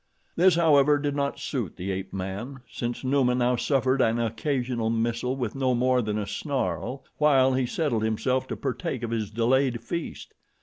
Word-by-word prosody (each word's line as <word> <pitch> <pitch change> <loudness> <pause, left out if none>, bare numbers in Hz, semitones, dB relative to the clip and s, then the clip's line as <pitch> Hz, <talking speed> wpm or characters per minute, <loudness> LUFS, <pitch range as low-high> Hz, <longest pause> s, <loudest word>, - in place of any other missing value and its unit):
This, 180 0 +5
however, 150 -3 +5
did 145 0 -2
not 140 -1 -1
suit 120 - -4
the 95 +2 -3
ape 95 0 -4
man, 100 +8 -5
since 120 +2 -4
Numa 130 -2 +2
now 125 0 +2
suffered 130 +1 +1
an 115 0 +2
occasional 120 0 -1
missile 115 +2 -1
with 120 -5 -3
no 130 -2 +1
more 125 +1 +2
than 105 -2 -2
a 105 - -2
snarl, 135 +3 -3
while 135 -3 +4
he 130 -1 +1
settled 130 -5 0
himself 125 +4 0
to - - -4
partake 135 -1 -3
of 115 - -3
his 110 -3 -2
delayed 120 +2 +1
feast. 170 -1 -5
125 Hz, 175 wpm, -26 LUFS, 115-140 Hz, -, This